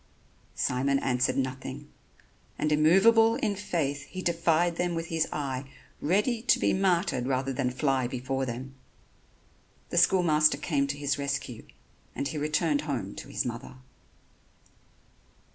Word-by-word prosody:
Simon 135 +2 +1
answered 125 -1 0
nothing; 130 +2 -4 0.7
and 155 - 0
immovable 205 +9 +5
in 210 -2 -1
faith 145 -8 -2
he 185 0 -7
defied 170 0 +2
them 175 -1 -1
with 165 0 -4
his 160 -1 0
eye, 135 -2 -4 0.3
ready 210 - +1
to 245 - +3
be - - +1
martyred 175 -8 +1
rather 135 0 -1
than 130 -1 0
fly 130 0 0
before 130 +2 -3
them. 130 +3 -6 1.2
The 175 - +3
school 180 +1 +4
master 155 -2 +4
came 140 -4 0
to 140 +1 -3
his 145 0 -1
rescue 140 -4 -4 0.5
and 140 - -2
he 155 - -4
returned 150 0 +1
home 125 - -4
to - - -9
his - - -2
mother. 120 +2 -6
145 Hz, 140 wpm, -28 LUFS, 135-170 Hz, 1.2 s, immovable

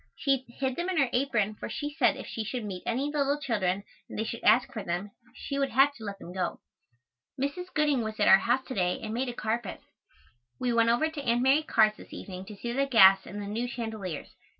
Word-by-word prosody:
She 270 -3 0
hid 260 +1 -3
them 345 +2 -2
in 370 - -1
her 275 -5 +2
apron 235 -5 +1
for - - -7
she 290 0 -4
said 305 - +2
if - - -7
she 225 - -4
should 235 +2 -4
meet 185 -3 -5
any 270 +5 0
little 285 -1 +1
children 200 -8 -1 0.3
and - - -7
they 220 - 0
should 230 +1 -6
ask 245 +5 +4
for 220 - -4
them 175 +4 -3 0.2
she 280 -1 -4
would 275 -1 +1
have 275 +4 +4
to 230 - -12
let 200 -2 -5
them 180 -2 -10
go. 185 -1 -2 0.8
Mrs. 360 +7 -3
Gooding 295 -4 +2
was 220 -1 -5
at - - +3
our 190 - +8
house 245 +4 +1
to - - -6
day 180 -4 0
and 215 0 -4
made 250 +2 -1
a - - -4
carpet. 220 -1 -3 0.8
We 245 -1 0
went 230 0 +4
over 240 +7 +3
to 315 -2 -6
Aunt 240 -2 +1
Mary 270 +4 +5
Carr's 220 -8 +3
this - - -13
evening 185 -1 -8
to 210 +1 -9
see 235 +4 -4
the 275 +2 +1
gas 195 -6 +6
and 205 - -7
the 205 - -5
new 225 +4 -2
chandeliers. 220 - -5
235 Hz, 240 wpm, -28 LUFS, 210-275 Hz, 0.8 s, our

